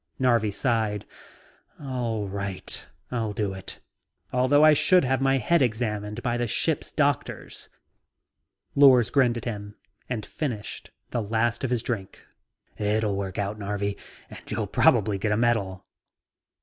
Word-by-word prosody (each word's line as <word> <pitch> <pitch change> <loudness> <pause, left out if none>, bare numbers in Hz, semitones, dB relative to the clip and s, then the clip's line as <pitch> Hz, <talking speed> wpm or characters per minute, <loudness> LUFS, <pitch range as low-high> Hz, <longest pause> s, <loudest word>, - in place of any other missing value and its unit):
Narvi 120 -4 +3
sighed. 110 -2 0 0.7
"All 120 -6 -2
right. 100 -1 -5 0.2
I'll 115 -4 -1
do 100 -2 -1
it, 95 -1 -6 0.5
although 130 +4 +5
I 155 - +8
should 180 +5 +4
have 130 +1 +1
my 135 0 +3
head 160 +7 +2
examined 110 -2 -1
by 120 0 0
the 120 0 -1
ship's 150 +6 0
doctors." 145 -3 -2 1.0
Lors 130 -5 +6
grinned 125 -4 +3
at 115 - -6
him 105 -3 -5 0.3
and 115 -4 -3
finished 120 -10 -5 0.2
the 120 - 0
last 115 +3 0
of 130 - 0
his 120 -2 0
drink. 100 -7 -4 0.6
"It'll 105 0 +1
work 95 -2 -4
out, 100 +1 -2
Narvi, 100 0 -2 0.3
and - - -10
you'll - - -2
probably 100 -1 +3
get 105 +2 0
a 105 - +2
medal." 110 -6 0
115 Hz, 140 wpm, -26 LUFS, 105-125 Hz, 1.0 s, I